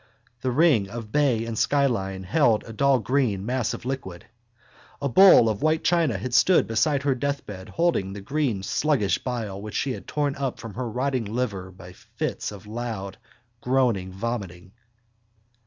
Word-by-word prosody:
The 130 - -1
ring 125 - +3
of 115 -1 -7
bay 135 -6 +2
and 115 -1 -4
skyline 110 -9 0
held 115 - +2
a 115 - -10
dull 135 +3 +3
green 110 -4 0
mass 125 -1 -1
of - - -11
liquid. 110 -10 -5 0.7
A 140 - -1
bowl 180 -3 +7
of 110 -2 -1
white 155 +1 +1
china 165 - +2
had 120 +6 -5
stood 170 +10 +5
beside 135 +5 +1
her 140 -1 +2
deathbed 125 -8 -4
holding 165 - 0
the 100 - -7
green 125 -4 -1
sluggish 130 -3 +1
bile 110 -6 -4
which 105 0 -7
she 135 - 0
had - - -7
torn 145 -2 -1
up 135 -2 -3
from 115 -5 -8
her 125 +1 -4
rotting 130 +1 -1
liver 105 -4 -3
by 90 -1 -13
fits - - -5
of 105 -1 -11
loud 105 -3 -5 0.4
groaning 120 -8 +1
vomiting. 95 -4 -5
120 Hz, 165 wpm, -25 LUFS, 100-140 Hz, 0.7 s, bowl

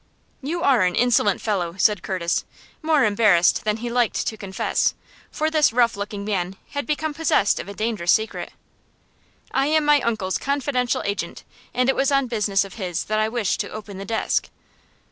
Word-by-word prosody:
"You 330 +5 -3
are 260 -5 +4
an 180 -1 +2
insolent 230 -4 +2
fellow!" 180 -6 -1
said 205 -2 +3
Curtis, 180 -3 -1 0.4
more 310 -3 +3
embarrassed 205 -5 +3
than 210 0 +1
he 235 +1 -5
liked 240 -1 +1
to 220 - -2
confess, 195 -3 -1 0.3
for 310 +1 -1
this 310 -5 +4
rough 235 0 +3
looking 200 0 -5
man 190 -3 -2 0.2
had 285 -3 -4
become 305 0 -1
possessed 295 -9 +2
of - - -6
a 200 - -8
dangerous 215 -6 0
secret. 220 0 0 1.0
"I 270 - +1
am 310 0 +2
my 295 -1 +5
uncle's 215 -6 -1
confidential 275 -3 -1
agent, 200 -4 -4 0.3
and 250 0 +1
it 270 - +3
was 275 +1 +1
on 275 -1 +3
business 210 -4 0
of 195 - -11
his 180 -3 -2
that 215 0 -1
I 215 0 +1
wished 225 -4 -1
to - - -3
open 210 -2 -8
the - - -5
desk." 225 +1 -1
220 Hz, 185 wpm, -23 LUFS, 200-270 Hz, 1.0 s, my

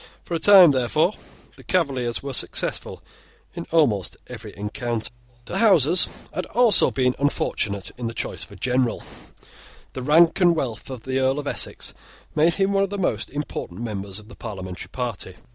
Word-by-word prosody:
For - - -7
a 165 - 0
time, 190 -3 +8
therefore, 145 - +1 0.4
the - - -14
Cavaliers 135 -10 0
were 140 -1 -5
successful - - -1 0.5
in 170 - -7
almost 120 - +1
every - - -9
encounter. 110 +3 -3 0.3
The 190 - -3
Houses 180 - +5 0.3
had 185 - -3
also 235 -2 +5
been 125 -1 +1
unfortunate 100 -8 -1
in 120 - -2
the 115 - -6
choice - - -4
of - - -11
a - - -11
general. 125 -2 0 0.9
The 130 - -5
rank 165 +7 +4
and 175 -2 +5
wealth 125 -8 -4
of 130 -4 -7
the 130 0 -1
Earl 130 +1 +1
of 145 - -4
Essex - - -4 0.4
made 160 +2 +3
him 195 0 +1
one 195 - +3
of 195 - +1
the 205 - -4
most 145 - -1
important 140 -9 -5
members 100 -4 -5
of 105 0 -9
the - - -13
parliamentary 95 -5 -7
party. 115 -6 -4
130 Hz, 175 wpm, -23 LUFS, 115-170 Hz, 0.9 s, time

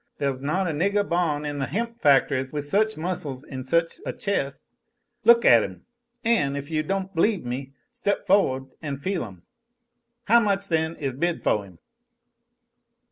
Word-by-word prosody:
There's 135 -2 -1
not 180 +7 0
a - - 0
niggah 200 +6 +1
ban' 160 -4 0
in 145 -1 -3
the 135 - -1
hemp 230 +6 -3
factories 135 -2 +3
with 145 -1 -3
such 215 +7 +1
muscles 155 -6 -4
an' 130 -3 -7
such 165 +5 0
a - - -3
chest. 140 -9 -2 0.6
Look 235 0 +7
at 115 -1 +8
'em! 95 -3 -7 0.4
An', 150 -12 +2
if 140 +2 -6
you 155 -1 +1
don't 195 +4 -3
b'lieve 195 - +1
me, 130 +3 -5 0.2
step 205 -5 -1
fo'ward 135 -9 +2
and 145 -4 -4
feel 185 +5 -2
'em. 95 -5 -11 0.8
How 235 +2 +5
much, 200 -3 0
then, 160 0 0
is 135 -4 -3
bid 170 +5 -1
foh 105 - +2
'im?" 90 -3 -16
155 Hz, 170 wpm, -25 LUFS, 135-195 Hz, 0.8 s, at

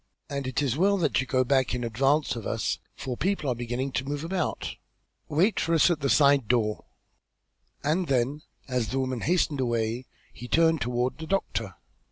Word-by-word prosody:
"And 140 -2 -3
it 130 +3 -1
is 135 - +1
as - - -5
well 200 +2 +4
that 155 -7 +1
you 130 - -5
go 130 +1 +2
back 130 -1 +2
in 125 - -3
advance 135 +6 +1
of 115 - -5
us, - - -1 0.2
for 130 -2 -4
people 190 0 -1
are 125 - +2
beginning 120 +3 -3
to 130 - -1
move 145 +2 -4
about. 180 0 -2 0.5
Wait 175 +9 +2
for 165 0 +1
us 165 +2 +5
at 165 - 0
the 140 -2 0
side 140 -5 +4
door." 110 -3 +1 1.0
And 165 +5 +1
then, 135 +2 0 0.3
as 125 -4 -1
the 130 - -3
woman 130 -3 -2
hastened 165 -4 +1
away, 120 0 -1 0.3
he 120 - -9
turned 165 +2 +3
toward 125 +4 -1
the 160 - -6
doctor. 195 +2 -2
135 Hz, 195 wpm, -27 LUFS, 125-155 Hz, 1.0 s, us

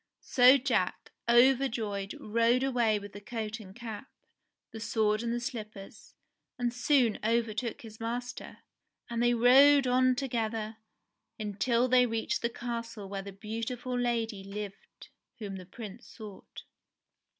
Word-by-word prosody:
So 255 +2 +6
Jack, 245 -8 -1 0.2
overjoyed, 235 -5 +3
rode 230 +4 +2
away 240 -5 +2
with 205 0 -9
the 205 - -9
coat 220 0 -5
and 195 -3 -12
cap, 230 0 -7 0.6
the 225 - -8
sword 215 -1 +1
and 235 0 -2
the 240 - -1
slippers, 215 -5 -8 0.4
and 240 -1 -1
soon 250 -2 +2
overtook 230 0 -1
his 220 -1 -11
master; 240 +2 -5 0.5
and 235 0 -1
they 240 0 +3
rode 270 +4 +6
on 255 0 +3
together 225 -4 -2 0.6
until 230 +4 0
they 250 0 +5
reached 225 -1 -1
the 235 - 0
castle 230 -3 -5
where 195 0 -4
the 200 +1 -8
beautiful 230 +5 -5
lady 230 -4 -1
lived 200 0 -9 0.3
whom 200 -4 -6
the 185 -1 -10
Prince 220 +3 -10
sought. 210 -4 -11
230 Hz, 135 wpm, -30 LUFS, 210-245 Hz, 0.6 s, So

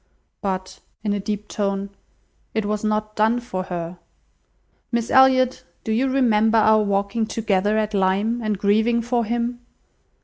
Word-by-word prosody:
But," 190 -1 -4 0.2
(in 205 -2 0
a 205 - -1
deep 210 +1 -4
tone,) 200 -1 -2 0.6
"it 220 -1 0
was 210 0 -2
not 215 0 -1
done 220 +3 +2
for 185 -6 -5
her. 175 -1 -5 0.9
Miss 235 -1 -1
Elliot, 260 -1 +4 0.2
do 220 - -3
you 255 +5 +1
remember 225 -4 +3
our 215 0 +5
walking 200 +2 0
together 210 -2 0
at 215 0 -1
Lyme, 200 +5 +1
and 215 -2 -1
grieving 220 +4 +2
for 240 0 0
him? 240 +2 -2
215 Hz, 145 wpm, -22 LUFS, 200-235 Hz, 0.9 s, our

